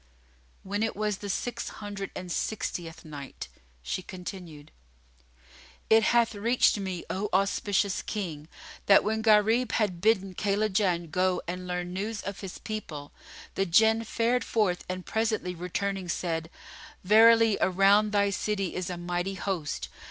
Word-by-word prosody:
When 205 +2 -3
it 225 0 0
was 210 -1 -1
the 205 - -7
Six 240 +5 -3
Hundred 205 -2 -6
and 180 -1 -6
Sixtieth 170 -5 -3
Night, 145 -3 -8 0.3
She 125 - -3
continued, 180 -5 -9 1.2
It 220 0 +7
hath 230 +1 +3
reached 225 +1 +2
me, 190 -3 -4
O 200 +2 -2
auspicious 200 +1 +1
King, 165 -8 -5 0.4
that 195 - +7
when 220 +1 0
Gharib 220 +2 +4
had 185 -6 0
bidden 195 -3 +2
Kaylajan 195 -4 0
go 185 +1 +1
and 180 +1 -5
learn 180 0 -3
news 210 +3 -3
of 200 0 -5
his 195 -3 -7
people, 160 -10 -6 0.4
the 195 - 0
Jinn 220 +6 +4
fared 235 +2 0
forth 200 -6 0
and 185 0 -4
presently 220 -5 -1
returning 180 +2 -3
said, 165 -1 -2 0.5
"Verily 225 +2 +6
around 200 +3 +4
thy 200 -1 +2
city 195 -2 -2
is 185 0 -3
a 180 - -4
mighty 175 +2 -2
host!" 180 -7 -3
195 Hz, 140 wpm, -28 LUFS, 180-215 Hz, 1.2 s, It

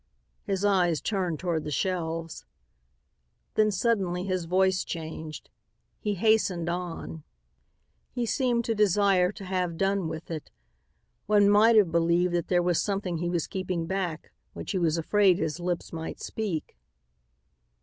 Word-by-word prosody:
His 195 0 -1
eyes 180 -6 +3
turned 185 -6 -1
toward 170 -3 -1
the 150 - -5
shelves. 165 - -2 1.1
Then, 215 0 +3
suddenly, 190 -4 0
his 185 -2 -2
voice 190 +2 +2
changed. 160 -2 -7 0.5
He 210 -1 -1
hastened 195 -4 +2
on. 175 -2 -5 0.9
He 245 -2 -2
seemed 240 -1 +1
to 225 - +1
desire 200 -3 +3
to 195 - -9
have 180 -3 -2
done 195 -1 +1
with 160 +1 -6
it. 155 -2 -5 0.8
One 205 -1 +5
might 220 +3 +6
have 200 -6 +5
believed 170 +2 +2
that 175 -2 0
there 175 -1 +2
was 175 -2 +2
something 195 -4 -2
he 175 +1 -1
was 170 -2 0
keeping 185 -3 -3
back 175 -3 -3 0.2
which - - -6
he 190 - 0
was 165 -2 +1
afraid 190 +2 +3
his 160 -3 -2
lips 175 -1 -3
might 160 0 -5
speak. 200 -8 -4
180 Hz, 145 wpm, -27 LUFS, 165-200 Hz, 1.1 s, might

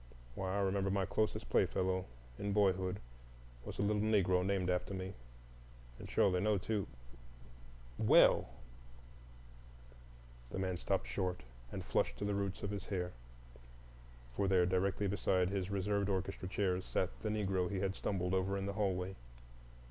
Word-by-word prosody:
Why, 95 +6 -2
I - - +1
remember 95 0 +1
my 95 -1 +1
closest 105 +3 -1
playfellow 95 0 +2 0.3
in 100 0 -1
boyhood 95 -1 +2 0.6
was - - -7
a - - 0
little 105 0 +2
Negro 95 -4 +3
named 95 -1 0
after 90 +2 0
me, 95 +1 -4 0.9
and - - -8
surely 90 -2 +3
no 105 +2 +2
two,—well!" - - 0 2.0
The - - -5
man 95 -1 -1
stopped - - 0
short 90 +6 -2 0.3
and - - -5
flushed - - 0
to 105 - -3
the 105 - 0
roots 100 -1 -2
of 100 - -2
his 100 -2 -5
hair, 90 -3 -2 1.2
for 100 - +1
there 95 -2 +4
directly 95 +2 +1
beside 95 -2 +1
his 95 -2 -1
reserved 100 0 0
orchestra 95 0 -2
chairs 95 -1 0
sat 95 - -1
the 110 - -1
Negro 95 -4 0
he 100 - -2
had 95 -1 0
stumbled 90 -2 -1
over 95 +1 +1
in 95 - -2
the 100 - -2
hallway. 95 -2 -1
95 Hz, 150 wpm, -36 LUFS, 90-100 Hz, 2.0 s, there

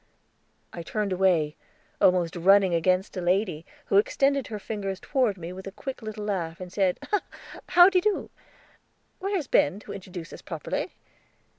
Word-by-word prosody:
I 170 - -6
turned 200 +3 -2
away, 175 -5 +2 0.5
almost 180 -2 +3
running 190 +1 +5
against 185 +4 +1
a - - -2
lady, 180 -2 0 0.2
who - - +2
extended 280 - +2
her 215 - -5
fingers 195 -2 -4
toward 250 -8 0
me 175 0 -7
with 190 +1 -9
a - - -5
quick 260 +7 -7
little 215 -1 -6
laugh, 170 -5 -3
and 180 -1 -8
said: 190 -3 +1 0.7
"How 350 0 +8
de 375 -2 +3
do? 420 +1 -1 0.9
Where's 385 -4 -1
Ben, 190 - +2
to - - -8
introduce 180 -3 -8
us - - -10
properly?" - - -4
195 Hz, 155 wpm, -26 LUFS, 180-225 Hz, 0.9 s, How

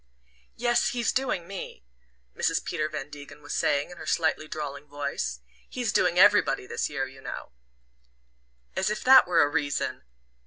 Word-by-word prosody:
"Yes 240 +2 +2
he's 240 -2 +1
doing 245 -10 -1
me," 195 - -8 0.5
Mrs. - - 0
Peter 155 0 -2
Van 150 -1 -6
Degen 145 0 -11
was 145 - -5
saying, 145 +3 +1
in 175 - -11
her - - -9
slightly 160 -1 +1
drawling 145 -2 -6
voice. 140 - -4 0.3
"He's - - -2
doing - - +2
everybody - - +5
this - - -2
year, 135 -2 -2
you 135 0 -14
know 135 - -7 0.6
" 60 0 -41
"As 190 +1 +1
if 210 - -3
that 260 -3 +8
were 175 -2 +4
a - - +3
reason!" 145 -1 -1
145 Hz, 165 wpm, -27 LUFS, 135-180 Hz, 0.6 s, that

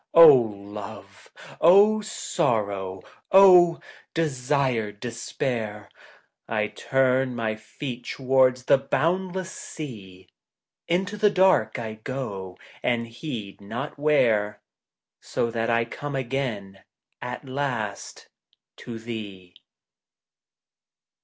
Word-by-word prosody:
Love! 105 -8 +4 0.3
O 205 +6 +6
Sorrow! 100 - -2 0.3
O 180 -3 +7 0.4
desired 130 -8 0
Despair! 115 -3 -4 0.6
1 105 -2 -1
turn 130 -1 +1
my 110 -2 -2
feet 120 +3 -7
towards 130 -1 +2
the 135 +1 +4
boundless 185 +5 -1
sea, 100 - -9 0.6
Into 190 +4 -1
the 210 0 +4
dark 190 -1 +3
I 110 -2 -6
go 100 -9 -5 0.2
and 120 -1 0
heed 115 -5 -7
not 120 +9 -6
where, 110 -9 +2 0.6
So 115 - -2
that 115 0 -1
I 115 0 +2
come 145 +4 -6
again 120 -7 -3 0.4
at 125 +3 -6
last 125 -7 -4 0.5
to 115 -2 -8
thee. 105 -6 -8
120 Hz, 90 wpm, -25 LUFS, 105-145 Hz, 0.6 s, O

